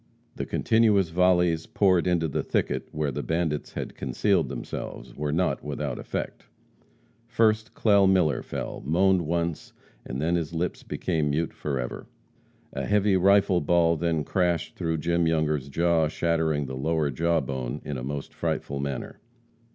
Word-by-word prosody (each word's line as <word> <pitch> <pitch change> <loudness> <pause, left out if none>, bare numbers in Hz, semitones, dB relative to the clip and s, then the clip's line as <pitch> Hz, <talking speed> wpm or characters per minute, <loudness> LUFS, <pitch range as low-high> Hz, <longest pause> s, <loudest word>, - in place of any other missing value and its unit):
The - - -4
continuous 105 -5 +3
volleys 90 -2 +2
poured 95 -4 +2
into 85 -2 +2
the 70 - -1
thicket - - -1
where 75 -2 -1
the - - -3
bandits 80 -3 -2
had - - -5
concealed 95 -10 0
themselves - - -6
were 75 0 -2
not 90 +4 0
without 75 -2 -4
effect. - - -5 0.8
First, 110 -1 +1
Clell 100 -3 +4
Miller 85 -8 +3
fell, - - -5
moaned 90 +5 +3
once, 85 -1 -2 0.3
and 65 - -5
then 80 +4 0
his 85 0 -4
lips 90 +2 -2
became 80 -5 -1
mute 80 +3 -1
forever. 65 -4 -4 0.7
A - - -3
heavy 105 -1 +3
rifle 95 -1 +4
ball 85 +2 +3
then 80 -1 0
crashed 85 +1 0
through 80 -2 -1
Jim 85 +1 +1
Younger's 75 -4 0
jaw, 85 +1 +2
shattering 80 -2 0
the 65 0 -6
lower 75 +2 0
jawbone 70 -5 -1
in 75 - -4
a - - -6
most 70 +1 -5
frightful 70 0 -2
manner. 70 -2 -4
80 Hz, 150 wpm, -26 LUFS, 75-90 Hz, 0.8 s, Clell